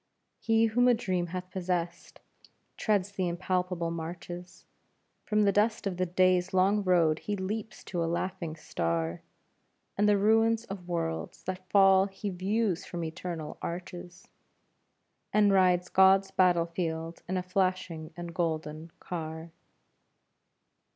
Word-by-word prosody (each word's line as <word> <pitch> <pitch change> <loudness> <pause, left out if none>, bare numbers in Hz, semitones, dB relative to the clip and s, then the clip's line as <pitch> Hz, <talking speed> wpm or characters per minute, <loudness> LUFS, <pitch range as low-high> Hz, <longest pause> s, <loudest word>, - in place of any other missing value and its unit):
He 225 0 +3
whom 245 +3 +3
a 245 - +6
dream 185 -6 -1
hath 180 +1 -6
possessed 175 -2 -3 0.5
treads 205 -3 0
the 190 -2 -1
impalpable 180 -1 -1
marches, 175 +2 -7 0.6
From 210 0 +2
the 200 - +4
dust 210 +2 +1
of 190 -3 -2
the 185 0 0
day's 185 +1 +2
long 200 +3 +3
road 170 -4 +3
he 210 - -3
leaps 205 +3 -5
to 175 -2 -2
a 165 - -1
laughing 175 -2 -3
star, 85 - -2 0.7
And 205 +1 +3
the 205 - +4
ruin 225 +2 +4
of 185 -3 -7
worlds 165 -2 -3
that 185 0 -6
fall 195 -1 +6
he 200 +1 -5
views 190 +1 0
from 170 -1 -5
eternal 160 -1 -5
arches, 175 0 -7 1.0
And 205 -1 +4
rides 180 -2 +4
God's 190 0 +5
battlefield 170 -2 0
in 185 - 0
a 180 - -1
flashing 185 -3 -1
and 175 -1 -6
golden 160 -1 -3
car. 160 -1 -6
180 Hz, 130 wpm, -29 LUFS, 170-195 Hz, 1.0 s, a